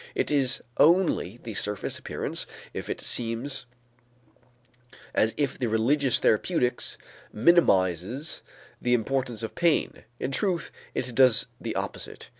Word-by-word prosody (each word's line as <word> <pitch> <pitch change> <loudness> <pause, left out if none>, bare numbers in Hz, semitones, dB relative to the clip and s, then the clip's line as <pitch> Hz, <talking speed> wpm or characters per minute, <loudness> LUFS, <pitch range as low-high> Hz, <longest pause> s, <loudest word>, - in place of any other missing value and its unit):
It - - 0
is 135 -4 +1
only 165 - +3
the 115 - -6
surface 105 0 -2
appearance - - -2 0.3
if - - -6
it - - -3
seems 120 +4 -1 1.5
as 110 +1 +2
if 145 -3 -1
the 125 - 0
religious 125 +4 +2
therapeutics 125 - +1 0.3
minimizes 110 - +2 0.4
the 125 0 +3
importance 120 -1 -2
of 110 - -4
pain; 170 -2 +1 0.2
in 135 - -2
truth 180 +3 -1 0.2
it 125 -1 -2
does 125 -1 +5
the - - -4
opposite. - - -5
125 Hz, 120 wpm, -27 LUFS, 110-145 Hz, 1.5 s, does